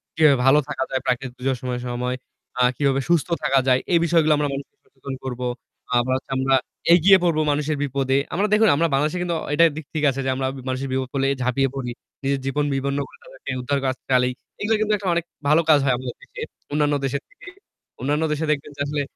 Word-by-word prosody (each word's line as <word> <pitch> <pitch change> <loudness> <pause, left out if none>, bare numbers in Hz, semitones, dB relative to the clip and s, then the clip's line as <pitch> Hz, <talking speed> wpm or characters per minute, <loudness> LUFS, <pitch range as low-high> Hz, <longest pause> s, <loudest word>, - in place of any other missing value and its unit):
কিভাবে 155 -3 +5
ভালো 135 +3 +6
থাকা 150 - -2
যায় 130 -1 0
প্রাকৃতিক 125 0 -1
দূর্যোগের 130 +1 -1
সম 130 - -5 0.2
সময় 125 +1 -2 0.4
আ - - +3 0.2
কিভাবে 135 -1 +2
সুস্থ 170 -4 +3 0.2
থাকা 135 0 +3
যায়। 130 0 +4
এই 170 - +6
বিষয়গুলো 160 -2 +4
আমরা 145 0 +1
মানুষকে 140 0 -7
সচেতন 135 0 -9
করবো। 125 -1 -3 0.5
আবার 120 +1 +2
হচ্ছে 130 +1 -6
আমরা 135 0 +3 0.4
এগিয়ে 190 +3 +7
পড়বো 165 -3 +2
মানুষের 150 +1 0
বিপদে। 135 -1 0 0.2
আমরা 195 +5 +1
দেখুন 220 +1 +5
আমরা 165 +3 +2
বাংলাদেশে 150 +5 +1
কিন্তু 175 -1 -1
অ - - -6
এটা 165 +3 +6
দিক 155 -1 -7
ঠিক 155 -2 -2
আছে 135 0 -3
যে - - 0
আমরা 130 0 -1 0.2
মানুষের 130 +1 -2
বিপদ 130 -1 -1
হলে 135 0 +1
ঝাঁপিয়ে 125 +2 +1
পড়ি। 125 -3 -3 0.3
নিজের 135 0 0
জীবন 145 +2 0
বিপন্ন 140 +1 -1
করে - - -18
তাদেরকে - - -8
উদ্ধারকাজ 135 0 -1
চালাই। 125 -1 +3 0.3
এগুলো 220 +2 +2
কিন্তু 215 0 +2
একটা 200 -1 -6
অনেক 170 - 0 0.2
ভালো 155 +3 +5
কাজ 150 -2 +7
হয় 135 -2 +3
আমাদের 125 -1 -6
দেশে, - - -10 0.3
অন্যান্য 145 0 +2
দেশের 135 +1 -2
থেকে। 410 - -17 0.5
অন্যান্য 145 +3 0
দেশে 150 +1 -1
দেখবেন 145 0 -2
যে - - -5
আসলে 145 0 -1
140 Hz, 210 wpm, -23 LUFS, 130-155 Hz, 0.5 s, এগিয়ে